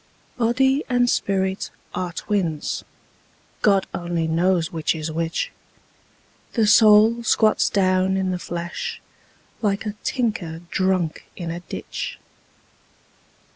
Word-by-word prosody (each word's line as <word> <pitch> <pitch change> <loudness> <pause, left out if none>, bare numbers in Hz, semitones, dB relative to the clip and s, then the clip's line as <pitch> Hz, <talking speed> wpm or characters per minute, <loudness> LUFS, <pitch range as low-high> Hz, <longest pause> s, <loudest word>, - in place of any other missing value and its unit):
Body 265 +4 +2
and 245 -1 +3
spirit 190 -4 0 0.2
are 180 -1 -2
twins: 170 -5 -2 0.8
God 195 -2 +4
only 170 -2 -2
knows 170 +1 +1
which 160 0 0
is 160 0 -4
which: 165 +1 -2 1.0
The 225 -3 +3
soul 215 +2 +6
squats 220 -1 +3
down 185 -1 +2
in 190 -1 0
the 180 - -2
flesh, 170 0 -5 0.6
like 205 -1 0
a 210 - -2
tinker 205 -10 -2
drunk 185 -4 0
in 170 -2 -5
a 170 - -4
ditch. 175 - -6
190 Hz, 110 wpm, -23 LUFS, 170-215 Hz, 1.0 s, soul